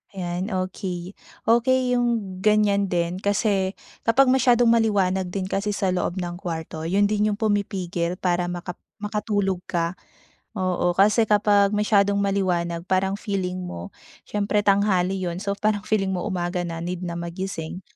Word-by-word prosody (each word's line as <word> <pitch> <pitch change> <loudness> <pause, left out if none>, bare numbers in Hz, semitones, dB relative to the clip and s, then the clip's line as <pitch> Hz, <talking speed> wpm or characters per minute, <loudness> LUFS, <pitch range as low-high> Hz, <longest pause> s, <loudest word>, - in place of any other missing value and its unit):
Ayan, 180 +2 -3
okey, 185 -1 -4 0.3
okey 250 +2 +3
yung 230 -6 -1
ganyan 205 -1 +3
din 175 +1 -1
kasi 200 -2 0 0.2
kapag 250 +4 +4
masyadong 250 -2 +4
maliwanag 200 -5 +2
din 185 +1 -3
kasi 195 +2 -2
sa 195 -2 0
loob 180 0 -1
ng 175 -2 -3
kwarto 165 -3 -5
yun 190 +5 +2
din 210 +1 +1
yung 205 - -2
pumipigil 185 -5 -1
para 175 -1 0
maka 175 0 -5 0.2
makatulog 205 -3 -1
ka 170 -1 0 0.6
oo 180 -1 +1
kasi 215 +3 +4
kapag 205 -1 +4
masyadong 205 -1 +3
maliwanag 175 -4 0
parang 190 +1 +2
feeling 185 -3 -3
mo 90 - -7 0.3
syempre 205 0 0
tanghali 195 -2 +2
yun 175 -1 -3
so 200 +1 -2
parang 210 0 0
feeling 195 -3 +1
mo 180 - -2
umaga 180 -2 -2
na 165 -1 -5
need 180 +1 -4
na 170 - -3
magising 170 0 -5
190 Hz, 145 wpm, -24 LUFS, 180-210 Hz, 0.6 s, kapag